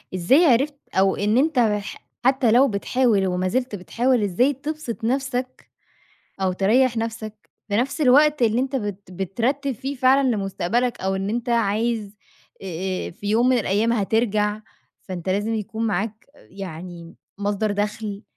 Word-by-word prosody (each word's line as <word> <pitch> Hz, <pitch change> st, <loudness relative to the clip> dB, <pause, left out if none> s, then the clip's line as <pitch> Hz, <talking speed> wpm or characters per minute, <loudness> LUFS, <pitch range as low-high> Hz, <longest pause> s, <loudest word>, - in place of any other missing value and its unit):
إزاي 260 Hz, -, +4 dB
عرفت 275 Hz, +2 st, +3 dB, 0.2 s
أو 190 Hz, 0 st, +3 dB
إن 210 Hz, +3 st, +1 dB
أنت 290 Hz, -1 st, +2 dB
بح 210 Hz, -3 st, -1 dB, 0.2 s
حتى 260 Hz, -3 st, +3 dB
لو 255 Hz, +4 st, +6 dB
بتحاول 215 Hz, -2 st, +1 dB
ومازلت 185 Hz, +7 st, -1 dB
بتحاول 235 Hz, +5 st, 0 dB
إزاي 240 Hz, +9 st, +2 dB
تبسط 285 Hz, -4 st, -6 dB
نَفْسك 255 Hz, +1 st, -2 dB, 0.7 s
أو 185 Hz, -1 st, +1 dB
تريّح 230 Hz, +6 st, +2 dB
نَفْسك 220 Hz, -1 st, -5 dB, 0.2 s
في 205 Hz, -, +1 dB
نَفْس 265 Hz, +6 st, -1 dB
الوقت 295 Hz, +2 st, +5 dB
اللي 230 Hz, 0 st, +3 dB
أنت 270 Hz, 0 st, -2 dB
بت 205 Hz, -5 st, -5 dB
بترتّب 235 Hz, -, -1 dB
فيه 270 Hz, +4 st, -5 dB
فعلًا 260 Hz, +2 st, +4 dB
لمستقبلك 220 Hz, +3 st, -1 dB
أو 190 Hz, 0 st, 0 dB
إن 195 Hz, +1 st, -2 dB
أنت 240 Hz, +2 st, -2 dB
عايز 220 Hz, -1 st, 0 dB, 0.5 s
آآ 185 Hz, +1 st, -3 dB
آآ -, -, -8 dB
في 200 Hz, +4 st, -8 dB
يوم 230 Hz, +4 st, +3 dB
من 255 Hz, -, +4 dB
الأيام 215 Hz, +2 st, +1 dB
هترجع 215 Hz, -1 st, 0 dB, 0.4 s
فأنت 185 Hz, -1 st, -6 dB
لازم 205 Hz, +4 st, 0 dB
يكون 225 Hz, +1 st, -3 dB
معاك 215 Hz, +2 st, -3 dB
يعني 175 Hz, -, -9 dB, 0.2 s
مصدر 205 Hz, +1 st, -1 dB
دخْل 210 Hz, 0 st, -3 dB
220 Hz, 145 wpm, -23 LUFS, 195-250 Hz, 0.7 s, لو